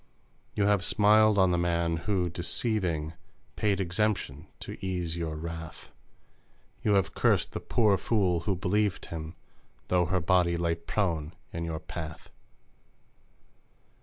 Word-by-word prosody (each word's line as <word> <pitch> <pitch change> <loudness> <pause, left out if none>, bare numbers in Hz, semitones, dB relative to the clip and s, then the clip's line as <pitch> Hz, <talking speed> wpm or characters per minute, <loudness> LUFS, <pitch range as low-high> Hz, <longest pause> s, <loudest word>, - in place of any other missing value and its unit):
You 100 - +2
have 100 -2 +3
smiled 110 +1 +4
on 95 -2 +4
the 85 - +1
man, 85 -1 +1
who, 95 -4 +1
deceiving, 85 -3 -1 0.4
Paid 100 -2 +1
exemption 90 -5 -1
to - - -8
ease 90 -3 -2
your 80 -2 -3
wrath! 80 +1 -7 0.9
You 105 -2 +2
have 100 0 +1
cursed - - +2
the - - -4
pour 105 -4 +2
fool 95 -5 +1
who 95 +3 -1
believed 100 +2 0
him, 80 0 -7 0.5
Though 90 -2 +3
her 95 +2 +1
body 85 0 +2
lay 85 -1 +1
prone 85 -2 -2 0.2
in 85 0 -3
your 80 -1 -3
path 80 -2 -8
90 Hz, 135 wpm, -29 LUFS, 85-100 Hz, 0.9 s, smiled